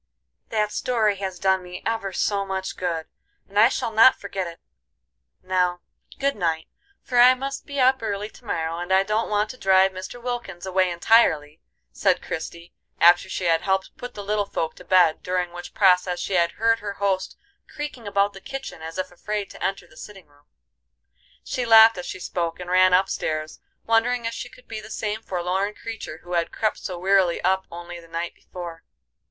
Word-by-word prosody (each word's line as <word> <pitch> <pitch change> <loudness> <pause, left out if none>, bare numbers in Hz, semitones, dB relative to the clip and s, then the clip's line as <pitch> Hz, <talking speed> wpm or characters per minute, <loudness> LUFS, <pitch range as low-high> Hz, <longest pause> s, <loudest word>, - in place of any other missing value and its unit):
"That 210 -1 0
story 215 -5 +1
has 190 -2 -4
done 190 +1 +2
me 180 0 -9
ever 225 -4 -1
so 200 +2 0
much 190 -1 -4
good, 170 -3 -2 0.4
and 205 +1 -1
I 225 +3 +7
shall 230 - -2
not 225 +4 +6
forget 195 -2 -4
it. 170 0 -10 0.8
Now, 180 -1 0 0.4
good 275 +1 0
night, 165 -4 -1 0.4
for 245 -2 +1
I 250 +1 +8
must 275 +1 -5
be 285 -1 -4
up 260 0 +4
early 205 -2 -3
to 220 - -18
morrow, 165 -4 -2
and 175 +1 -5
I 190 +1 +5
don't 215 +3 -1
want 210 0 +1
to 255 - -14
drive 190 0 +4
Mr. 190 +5 -8
Wilkins 235 -7 -5
away 185 -1 +2
entirely," 170 -5 +3 0.3
said 190 -2 +2
Christie, 170 +1 -6 0.3
after 175 +2 +6
she 190 - -3
had 165 -2 +3
helped 190 0 -1
put 245 0 -8
the 205 - -6
little 205 0 0
folk 160 - -2
to - - -12
bed, 175 -4 +4
during 180 -1 -1
which 175 0 -9
process 180 -2 +3
she - - -3
had 170 -2 +2
heard 225 0 +2
her 205 -2 -5
host 195 -2 -1 0.3
creaking 295 -7 -6
about 200 0 +1
the 195 - -11
kitchen 270 -10 -7
as 160 +1 -7
if 185 -1 -3
afraid 205 +3 -4
to - - -9
enter 195 -2 -2
the 160 - -21
sitting 195 +1 -11
room. 145 0 -28 1.0
She 255 - -3
laughed 225 -3 +7
as 180 - -6
she - - -6
spoke, 170 -2 -3
and 180 0 -6
ran 185 0 +6
up 190 +1 +3
stairs, 155 -4 -3 0.3
wondering 230 +1 +2
if 230 - -2
she 245 - -6
could 250 0 -18
be 225 -1 -5
the 215 - -12
same 215 0 -3
forlorn 190 +2 -2
creature 220 -8 -7
who 175 +1 -7
had 170 -1 0
crept 215 -1 -1
so 180 -3 -5
wearily 190 -1 +3
up 190 +1 +1
only 175 0 -8
the 165 - -15
night 170 +1 -4
before. 170 -2 -9
190 Hz, 195 wpm, -24 LUFS, 175-220 Hz, 1.0 s, I